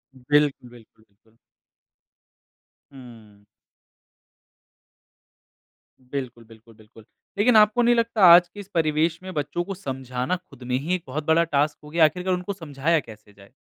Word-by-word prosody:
बिल्क 145 +2 +1
बिल्कुल, 115 -2 -18
बिल्कुल। 110 +3 -33 1.6
हुँ। 110 -6 -15 2.6
बिल्कुल, 125 -2 -7
बिल्कुल, 115 0 -18
बिल्कुल, 110 0 -19 0.3
लेकिन 225 +3 +3
आपको 215 +3 +4
नहीं 240 0 +3
लगता 230 -3 0
आज 175 +1 +6
के 205 +4 -14
इस 200 - -10
परिवेश 160 0 0
में 185 - -8
बच्चों 150 +3 -3
को 195 +2 -6
समझाना 130 -2 -4
खुद 180 -8 -14
में 125 +1 -1
ही 165 +7 -2
एक 175 - -7
बहुत 145 +4 -5
बड़ा 160 +2 +3
टास्क 150 -1 -1
हो 150 - -12
गया 160 +1 +4
आखिरकार 180 +4 -1
उनको 180 +2 -4
समझाया 160 -2 -1
कैसे 105 -4 -14
जाए? 100 +1 -19
150 Hz, 145 wpm, -23 LUFS, 120-175 Hz, 2.6 s, आज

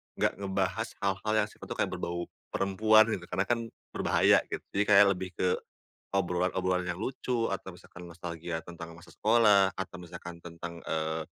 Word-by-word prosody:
enggak - - +1
ngebahas 100 +3 -1
hal-hal 100 +2 0
yang 105 -1 +3
sifatnya - - -12
tuh - - -13
kayak - - 0
berbau 85 0 -3 0.3
perempuan, 110 +3 +5
gitu. 90 -4 -3
Karena 95 +2 0
kan 120 -1 +2 0.3
berbahaya - - +4
gitu, - - -4
jadi 100 - +4
kayak 100 0 +8
lebih 95 0 -4
ke 90 -1 +1 0.6
obrolan-obrolan 90 0 +1
yang 85 +1 -3
lucu 120 -1 -1
atau 95 -1 -4
misalkan 90 0 -13
nostalgia 85 -1 -5
tentang 85 -1 -9
masa 85 - -15
sekolah 105 -3 +5
atau 95 -1 -5
misalkan 85 0 -9
tentang 85 0 -7
eee, 80 0 -1
95 Hz, 165 wpm, -30 LUFS, 85-100 Hz, 0.6 s, kayak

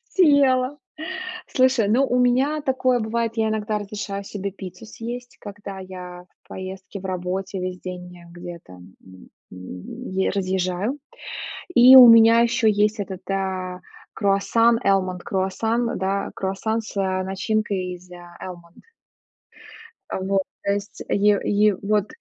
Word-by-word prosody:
Съела. 285 -6 +4 0.7
Слушай, 255 -5 +3
ну, 255 +6 +4
у 250 - 0
меня 260 +5 +2
такое 260 -3 +1
бывает, 230 +1 -1
я 220 -1 +1
иногда 215 0 -1
разрешаю 205 -1 -5
себе 200 0 -5
пиццу 185 +1 -10
съесть, 240 +3 -8
когда 200 -1 -8
я 180 -1 -9 0.2
в - - -30
поездке, 190 +1 -8
в - - -10
работе 185 +1 -3
весь 180 0 -4
день 180 -1 -7 0.2
где-то, 175 - -10
м, 95 +1 -16 0.2
е 90 - -4
разъезжаю. 190 +5 -1 0.8
И 255 0 +9
у 250 -2 +11
меня 230 0 +8
ещё 235 -1 +2
есть 210 0 +2
этот, 190 -2 -7
э, 185 -2 -3 0.3
круассан, 225 +3 +3
almond 185 -2 +1
круассан, 225 +6 -1
да, 195 +1 -1
круассан 195 +4 -2
с, 215 - -11
а, 190 -1 0
начинкой 190 -1 -2
из 180 0 -15
almond. 175 0 -11 1.3
Вот, 190 0 0 0.2
то 200 - +1
есть, 200 0 -6
е 205 0 +3 0.3
е 210 -2 +4
вот 210 0 +1
200 Hz, 130 wpm, -23 LUFS, 185-230 Hz, 1.3 s, у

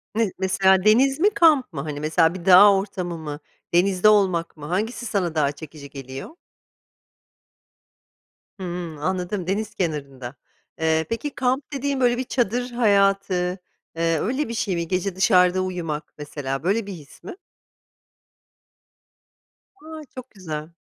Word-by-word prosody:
Ne, 220 -4 +1
mesela, 190 0 +3
deniz 260 +7 +4
mi, 405 +5 +5
kamp 315 - +3
mı, 140 - -4
hani, 150 -1 -5
mesela, 160 +2 +2
bir 180 -2 -9
dağ 190 +2 +8
ortamı 185 -3 -3
mı, 150 -2 -7 0.3
denizde 185 +3 +4
olmak 185 -6 +2
mı 150 - -9
hangisi 215 +9 -3
sana 180 -7 -2
daha 145 -2 +2
çekici 145 -1 -11
geliyor? 135 - -9 2.2
Hımm. 175 -3 -5
Anladım 180 +3 -3
deniz 210 +3 -2
kenarında. 140 -6 -4 0.5
Iıı, 160 0 +2
peki, 230 +6 -3
kamp 260 +3 -1
dediğin 275 0 -2
böyle 245 -1 +2
bir 260 - -1
çadır 245 0 -1
hayatı, 200 -4 +2 0.6
ııı, 165 -1 0
öyle 260 +7 -1
bir - - -4
şey 200 -5 -1
mi, 170 -1 -3
gece 185 +1 -2
dışarıda 185 -2 +4
uyumak 170 -5 -4
mesela 140 -2 -5
böyle 200 +4 0
bir 200 - -5
his 150 -5 -14
mi? - - -8 2.5
A, 315 0 -9
çok 255 0 -9
güzel. 160 -4 -7
185 Hz, 140 wpm, -23 LUFS, 160-225 Hz, 2.5 s, dağ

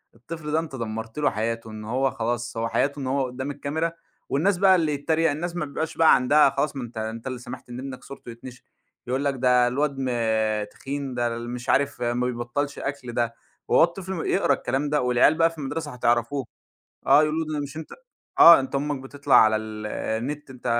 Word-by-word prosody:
الطفل 150 +6 -7
ده 155 - +2
أنت 160 -4 -6
دمّرت 110 0 -5
له 150 - +3
حياته، 115 +1 -3
إن 110 0 -8
هو 130 +4 0
خلاص 120 +1 -3
هو 115 0 0
حياته 140 +4 0
إن 135 - -4
هو 135 +1 +1
قدّام 130 +3 -5
الكاميرا، 160 +4 -2 0.4
والناس 180 +7 +2
بقى 190 0 +6
اللي 160 -4 +1
يتّريَق، 160 +2 +1
الناس 170 +4 -4
ما 155 -3 -2
بيبقاش 155 +3 -4
بقى 165 -1 +7
عندها 140 +3 +4
خلاص 140 +2 -1
ما 135 - -4
أنت 120 -1 -9
أنت 110 +3 -5
اللي 130 -1 -4
سمحت 125 0 -10
إن 120 +1 -7
ابنك 130 -1 -7
صورته 140 -3 -11
يتنشر، 125 +2 -11 0.4
يقول 130 +3 -1
لك 140 - +2
ده 125 -1 +3
الواد 140 +2 -1
ما 110 -4 0
تخين، 135 +5 -6
ده 120 -1 0
ال 120 0 -6
مش 125 0 -6
عارف 140 -2 +1
ما 120 +1 0
بيبطّلش 125 +4 -3
أكل، 135 -3 -5
ده 120 -1 -1 0.3
وهو - - +5
الطفل 185 +3 -2
يقرا 195 - +2
الكلام 140 +2 -2
ده، 150 -1 +1
والعيال 125 +4 +4
بقى 165 +1 +4
في 165 - -14
المدرسة 150 +1 -4
هتعرفوه، 120 +2 0 0.6
آه 150 - +7
يقولوا 155 +1 0
له 155 - -5
ده 150 - -1
مش 145 +1 -7
أنت 160 - -8 0.5
آه 170 -3 +10
أنت 135 - -6
أمك 145 0 -1
بتطلع 140 +1 -1
على 110 0 +6
ال 110 0 -6
النت، 135 +8 -4
أنت 130 -2 -10
135 Hz, 210 wpm, -24 LUFS, 120-150 Hz, 0.6 s, آه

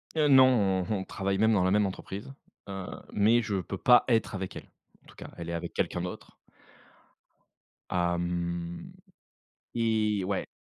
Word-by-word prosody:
Heu, 155 -2 +3
non, 125 -9 +5
on 110 - +1
on 95 - -4
travaille 95 0 -2
même 110 +2 +3
dans 95 -3 +3
la 95 - +2
même 105 0 +3
entreprise, 100 +5 -6 0.4
heu 95 -2 -5 0.3
mais 110 +4 +4
je 105 -4 -2
peux 95 +3 -6
pas 125 +4 +6
être 115 -3 +1
avec 95 -1 -5
elle. - - -9 0.3
En - - -24
tout - - -17
cas, - - -10
elle 85 0 -6
est - - -3
avec 85 - -5
quelqu'un 90 - -1
d'autre 90 0 -7 1.6
hem 85 -1 -2 0.8
et 110 -4 +1
ouais. 95 0 -2
95 Hz, 165 wpm, -28 LUFS, 90-110 Hz, 1.6 s, pas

